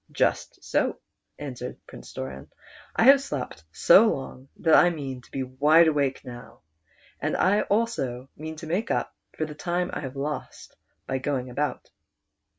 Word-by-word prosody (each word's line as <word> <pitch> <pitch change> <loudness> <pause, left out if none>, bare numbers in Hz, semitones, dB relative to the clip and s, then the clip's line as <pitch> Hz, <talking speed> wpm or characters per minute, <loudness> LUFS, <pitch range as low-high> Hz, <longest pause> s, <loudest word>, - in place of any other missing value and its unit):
"Just - - -1
so," - - 0 0.4
answered 125 -3 -6
Prince - - -12
Doran, 65 +1 -7 0.5
"I - - +3
have 275 +3 +8
slept 130 - -5
so 195 - +6
long 135 -7 -4
that 160 -2 +2
I 175 - +7
mean 135 -6 -5
to - - -21
be 135 - -3
wide 150 +6 +5
awake 140 -4 0
now, 120 -1 -11 0.6
and - - -1
I 205 +3 +3
also 135 - -1
mean 160 +1 -7
to 160 +1 -9
make 180 +8 -1
up - - -1 0.2
for 155 - 0
the 150 - -8
time 175 +4 -2
I - - -2
have 130 -2 -6
lost 145 +2 -5 0.3
by 130 - -2
going 130 -2 -2
about." 145 +4 -3
145 Hz, 160 wpm, -26 LUFS, 130-170 Hz, 0.6 s, have